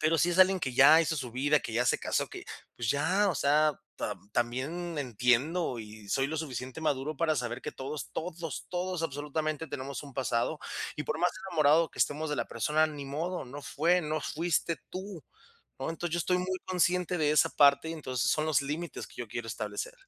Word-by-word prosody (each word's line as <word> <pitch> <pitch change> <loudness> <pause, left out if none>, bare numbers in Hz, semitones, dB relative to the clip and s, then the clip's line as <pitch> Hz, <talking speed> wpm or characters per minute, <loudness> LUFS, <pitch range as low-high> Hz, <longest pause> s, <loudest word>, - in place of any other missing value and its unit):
pero 160 +1 +3
sí 170 - +4
es 175 - -1
alguien 185 0 +6
que 130 -5 -2
ya 150 +5 +8
hizo 160 -1 0
su 125 -4 -4
vida, 145 +4 +2
que - - -6
ya 120 +2 +2
hace - - +2
casó, - - -1
que - - -9 0.3
pues 115 -2 0
ya, 185 +8 +2
o - - -2
sea, 150 +2 +3 0.2
tam 100 - -5
también 140 +9 -2
entiendo 125 - +1
y 105 -1 -11
soy 135 +5 +1
lo 160 - -3
suficiente 130 -2 -5
maduro 150 -1 -1
para 160 +1 +2
saber 120 0 -3
que - - -5
todos, 140 +2 -6
todos, 165 -2 -5
todos, 180 -1 -2
absolutamente, 155 +1 -2
tenemos 135 0 -5
un 140 -2 -11
pasado 130 +3 0 0.4
y, 150 - -2
por - - -2
más 180 - +3 0.2
enamorado 160 -1 +4
que - - -15
estemos 150 +1 +1
de 150 - -1
la - - -1
persona, 155 +1 +2
ni 150 -2 -7
modo, 165 +6 -3
no 140 +4 -8
fue, 170 +6 +2
no 155 0 -2
fuiste 165 +1 0
tú, 190 -3 -6 0.6
¿no? - - -2
Entonces, 165 0 -4
yo - - +1
estoy 180 +2 +1
muy 185 +1 -2
consciente 180 -1 +1
de 150 -1 +3
esa 155 - +5
parte 140 +2 +5
y, - - -3
entonces, 130 -5 -1
son 155 0 +1
los 155 -2 +3
límites 155 +5 -4
que - - -17
yo 120 - -5
quiero 115 +2 -5
establecer. 105 -2 -4
150 Hz, 210 wpm, -30 LUFS, 135-165 Hz, 0.6 s, ya